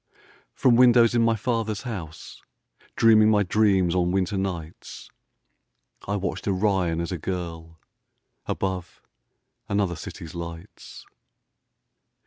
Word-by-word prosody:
From 120 -3 +3
windows 120 -2 +6
in 120 - +2
my 115 0 +3
father's 110 -2 -2
house, 85 -10 -8 0.5
Dreaming 110 -2 +5
my 105 -2 +3
dreams 95 -3 +2
on 90 -1 +1
winter 95 +1 0
nights, 90 -4 -6 1.0
I 100 - -1
watched 100 0 -4
Orion 95 -4 0
as 85 +1 -3
a 90 - -4
girl 80 -2 -6 0.7
Above 95 -2 -4 0.7
another 100 -3 0
city's 80 +1 -9
lights. 85 +2 -9
95 Hz, 110 wpm, -24 LUFS, 85-110 Hz, 1.0 s, windows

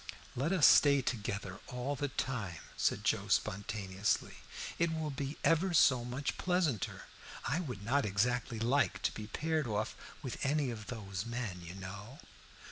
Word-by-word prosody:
"Let 140 +7 0
us 185 -6 +5
stay 140 -2 +7
together 110 -5 -3
all 125 +3 -2
the 145 +1 -1
time," 120 -9 -3 0.2
said - - +1
Joe - - +1
spontaneously, 100 0 0 0.4
"it 170 -1 +3
will 160 -2 -2
be 140 +1 -4
ever 170 +2 +3
so 130 -5 +6
much 125 +3 -3
pleasanter. 175 - 0 0.4
I 160 - +1
would 125 - -5
not 140 +4 +3
exactly 115 +3 0
like 125 +5 +1
to - - +2
be 105 -1 -7
paired 155 +5 0
off 110 +1 -1 0.3
with 130 - -4
any 140 -1 +2
of 110 -2 -7
those 100 -5 -4
men, 115 -7 -3
you 85 +1 -8
know." 100 +7 -8
125 Hz, 155 wpm, -34 LUFS, 105-145 Hz, 0.4 s, stay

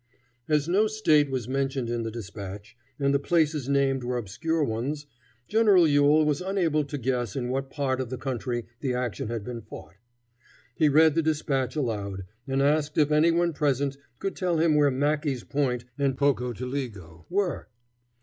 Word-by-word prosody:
As 150 -1 +2
no 200 +5 +3
State 155 -10 +3
was 130 -4 -3
mentioned 135 -1 -1
in 120 0 -2
the 115 - -3
dispatch, 100 -2 -8 0.2
and 140 0 +2
the 140 - +3
places 150 -3 +1
named 135 -2 +2
were 125 0 -1
obscure 155 - -1
ones, 140 +5 -2 0.4
General 205 -6 +5
Ewell 145 +1 +4
was 150 +1 0
unable 180 -5 +1
to 145 +1 -5
guess 125 -4 -2
in 125 -2 -2
what 135 +1 -2
part 135 -2 -1
of 125 - -5
the 130 - -4
country 120 -2 -3
the 130 -3 -1
action 125 -4 -3
had 115 -2 -4
been 120 +1 -6
fought. 75 - -11 0.8
He 155 +1 +3
read 155 +2 +5
the 165 - +2
dispatch 145 -4 -1
aloud, 100 -9 -3 0.2
and 135 +1 +1
asked 150 +1 +1
if 150 -1 +3
any 155 +2 +5
one 170 0 +2
present 140 -2 0 0.2
could 195 - -3
tell 180 -3 0
him 160 0 +3
where 145 -1 +4
Mackey's 145 -1 0
Point 125 -4 -1
and 135 -2 +1
Pocotaligo 125 - -2
were. 190 -1 -1
140 Hz, 170 wpm, -26 LUFS, 125-155 Hz, 0.8 s, General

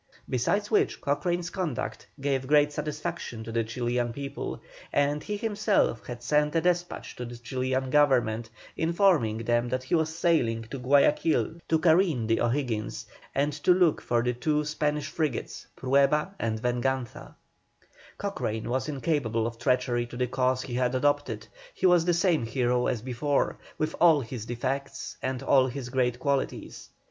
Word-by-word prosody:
Besides 200 - 0
which 215 - +2
Cochrane's 175 +4 -1
conduct 175 - -3
gave 135 -1 -1
great 150 0 +4
satisfaction 150 -5 -4
to 115 - -7
the 115 0 +1
Chilian 120 +1 -1
people, 140 +2 -5 0.3
and 145 +1 +1
he 210 +5 -4
himself 210 - 0
had 120 -1 -7
sent 150 +3 +2
a 165 - +3
despatch 175 0 -1
to 125 - -4
the 120 0 -8
Chilian 130 +2 -2
Government, 120 -6 +3 0.3
informing 165 - +2
them 120 +1 +1
that 130 +1 -2
he 130 - -5
was 160 -1 +1
sailing 120 -11 +2
to 135 - -4
Guayaquil 145 +5 +3
to 160 - +4
careen 160 - +3
the 115 +1 +1
O'Higgins, 120 -3 -1 0.3
and 145 +2 +1
to 150 +5 +3
look 180 -4 +3
for 120 -1 +1
the 125 0 +1
two 150 +5 0
Spanish 150 -1 -1
frigates 155 -5 -3
Prueba 140 +7 +2
and 110 -1 -1
Venganza. 125 +1 -2 0.8
Cochrane 110 +2 -3
was 130 +4 -1
incapable 135 -6 0
of 115 0 -5
treachery 120 -1 +1
to 120 - -9
the 125 - +1
cause 130 +1 0
he 125 - -7
had 125 +1 +1
adopted, 145 +2 0 0.3
he - - -1
was 175 -2 +5
the 175 - +3
same 170 - +2
hero 125 +1 +1
as 115 -3 -2
before, 130 +3 0 0.2
with 155 +1 -1
all 165 -4 +6
his 115 -2 -6
defects 130 +3 -4
and 130 -1 -3
all 130 -2 +4
his 125 0 -5
great 125 -2 +1
qualities. 140 +1 -2
135 Hz, 160 wpm, -27 LUFS, 120-155 Hz, 0.8 s, all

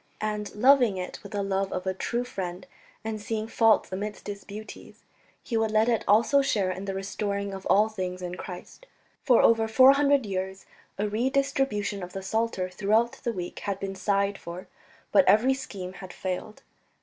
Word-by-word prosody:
And 210 -1 -3
loving 245 -3 +5
it 180 0 -6
with - - -11
the 200 -1 -1
love 195 0 -1
of 185 - -3
a 190 - 0
true 235 +5 -2
friend, 185 -7 -5 0.4
and 220 -1 -4
seeing 220 +1 -3
faults 225 -3 +3
amidst 205 +3 -5
its 200 -1 -6
beauties, 215 +2 -10 0.4
he 230 - -2
would 225 0 +1
let 215 +1 +3
it 230 -2 +1
also 230 +7 +5
share 200 -8 +1
in 190 +2 -5
"the 195 -1 -3
restoring 200 0 -3
of 190 0 -6
all 210 +2 +5
things 185 -4 -5
in 175 0 -4
Christ." 180 - -9 0.3
For 250 -5 +4
over 225 -1 +4
four 255 +4 +7
hundred 280 -2 +3
years 190 -1 -4 0.3
a 210 - 0
redistribution 245 -3 0
of 180 0 -7
the 195 - -5
Psalter 220 -2 -1
throughout 210 +6 +1
the 235 - 0
week 180 -5 -6
had 200 -1 -3
been 195 0 -4
sighed 200 +1 0
for, 175 +2 -8 0.4
but 285 - +6
every 220 +7 +5
scheme 195 -9 -7
had 185 -1 -9
failed. 190 +3 -5
205 Hz, 185 wpm, -27 LUFS, 190-225 Hz, 0.4 s, four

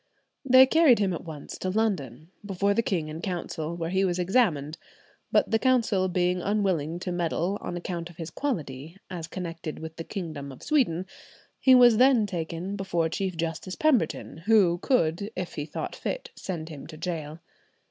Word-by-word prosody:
They 260 -1 +8
carried 300 -3 +5
him 195 -3 +1
at 170 - -6
once 155 -3 -8
to 185 - -2
London, 175 - -1
before 200 0 0
the 230 - +2
king 180 -8 -1
in 155 +2 -6
Council, 170 -3 -4
where 165 0 -3
he 190 +1 +2
was 180 -2 +1
examined, 175 - +1 0.5
but - - +3
the 225 - +3
Council 230 -7 +2
being 180 0 +1
unwilling 185 -6 0
to 180 - -3
meddle 175 +3 -1
on 175 - -4
account 175 -1 -4
of 170 - -16
his 165 -1 -6
quality, 160 - -4
as 170 -3 -5
connected 165 -3 -6
with 160 0 -8
the 165 - -4
kingdom 155 -8 -6
of 130 - -13
Sweden, 225 - +1 0.5
he 260 -1 +6
was 240 -3 +7
then 250 -3 +5
taken 175 0 -4
before 175 -4 -1
Chief 185 +1 -3
Justice 165 +3 -3
Pemberton, 255 - +1
who 190 -6 +5
could, 195 - +1
if 185 -1 -4
he 145 - -4
thought 150 - -5
fit, - - -4
send 165 -4 -5
him 150 -3 -9
to 155 - -10
gaol. 155 -3 -4
180 Hz, 180 wpm, -27 LUFS, 160-205 Hz, 0.5 s, They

